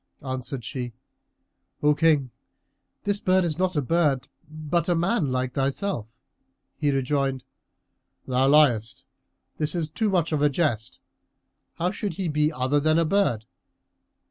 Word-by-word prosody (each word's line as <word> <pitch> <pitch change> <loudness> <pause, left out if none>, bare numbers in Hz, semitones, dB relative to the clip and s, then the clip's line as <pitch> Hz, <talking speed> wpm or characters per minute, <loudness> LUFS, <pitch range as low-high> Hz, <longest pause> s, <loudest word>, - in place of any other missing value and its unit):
Answered 130 -1 -4
she, 125 -2 -5 0.9
"O 150 0 +5
King, 150 -5 +2 0.7
this 205 0 0
bird 185 -1 +3
is 165 0 -3
no 185 0 +3
bird, 150 -4 +1 0.2
but 155 +2 -2
a 175 - +3
man 170 - +1
like 130 -1 -1
thyself." 135 - -1 0.7
He 150 - 0
rejoined, 135 -1 0 0.8
"Thou 130 +1 +2
liest, 135 -7 +3 0.5
this 150 +2 0
is 160 -3 -2
too 220 +5 0
much 175 -4 +1
of 150 -2 0
a 150 - +4
jest. 130 -7 -1 0.8
How 175 +2 0
should 205 0 -4
he 190 -3 -2
be 150 0 +1
other 140 0 +1
than 155 +2 +2
a 165 - +3
bird?" 155 - +1
150 Hz, 140 wpm, -25 LUFS, 130-170 Hz, 0.9 s, O